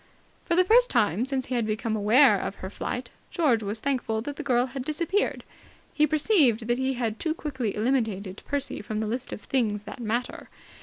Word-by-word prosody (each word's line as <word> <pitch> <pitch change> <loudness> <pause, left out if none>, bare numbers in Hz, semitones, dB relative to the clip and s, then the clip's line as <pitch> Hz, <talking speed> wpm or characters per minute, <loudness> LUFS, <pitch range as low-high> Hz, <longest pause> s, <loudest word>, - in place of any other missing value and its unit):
For 340 - +1
the 365 - +5
first 485 +5 +5
time 225 -1 +1
since 265 -1 -1
he - - -5
had 235 -3 0
become 220 +1 -1
aware 215 +1 +5
of 195 - -4
her 190 - -7
flight, 250 +4 -4 0.2
George 280 -10 +2
was 210 +1 -3
thankful 245 -4 -1
that 285 +2 -5
the - - -5
girl 250 -4 +2
had 265 0 -6
disappeared. 335 +8 -1 0.5
He 305 0 +3
perceived 290 - +3
that 240 +1 +1
he 260 0 0
had 230 -3 -2
too 315 -1 -1
quickly 260 -10 -3
eliminated 215 -5 -1
Percy 285 -1 -2
from 215 +1 -4
the 220 - -1
list 240 +4 -4
of - - -6
the - - -20
Things 215 -6 0
That 215 +5 -9
Matter. 235 +2 -3
245 Hz, 205 wpm, -26 LUFS, 215-280 Hz, 0.5 s, the